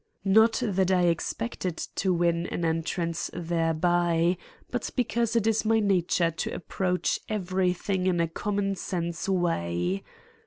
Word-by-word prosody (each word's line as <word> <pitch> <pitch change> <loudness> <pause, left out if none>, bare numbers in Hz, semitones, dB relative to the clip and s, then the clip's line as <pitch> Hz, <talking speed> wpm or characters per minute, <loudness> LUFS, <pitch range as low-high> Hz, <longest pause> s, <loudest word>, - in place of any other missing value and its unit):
Not 220 +5 +4
that 190 -3 +1
I 185 -1 +3
expected 175 +1 -1
to 190 - -2
win 170 -1 +1
an 175 - -2
entrance 165 +1 -1
thereby, 170 +1 +1 0.4
but 245 -2 -2
because 235 -1 0
it 230 -2 +2
is 220 -1 +2
my 225 0 +3
nature 180 -4 +2
to 165 - -4
approach 180 0 -1
everything 185 -1 0
in 175 -2 +2
a 170 - +2
common 200 +4 -1
sense 170 -2 -3
way. 95 - 0
180 Hz, 130 wpm, -27 LUFS, 170-195 Hz, 0.4 s, Not